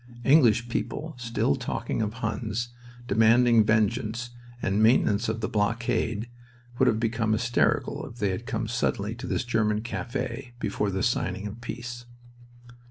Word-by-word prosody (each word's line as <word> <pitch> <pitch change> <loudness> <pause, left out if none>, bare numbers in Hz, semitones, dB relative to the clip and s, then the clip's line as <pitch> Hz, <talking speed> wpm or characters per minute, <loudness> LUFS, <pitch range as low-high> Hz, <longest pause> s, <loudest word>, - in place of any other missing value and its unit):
English 120 -5 +5
people 155 +6 -3
still 115 -11 0
talking - - -3
of 105 -1 -1
Huns, 115 0 -3 0.4
demanding 115 +2 +5
vengeance, 110 +2 0 0.3
the 100 - -1
maintenance 110 +1 +3
of 110 +1 -2
the 110 - 0
blockade, 115 +1 0 0.5
would - - +5
have 110 - +3
become 115 -1 0
hysterical 120 +2 +1
if 115 - -12
they 105 -4 0
had 105 +6 -5
come 115 -3 -2
suddenly 110 -3 -1
to 120 - -7
this - - -1
German 110 -3 +1
cafe 120 +1 -4
before 105 -2 -1
the 95 0 -2
signing 100 -5 0
of 105 +3 -7
peace. 120 0 -6
115 Hz, 145 wpm, -27 LUFS, 105-120 Hz, 0.5 s, English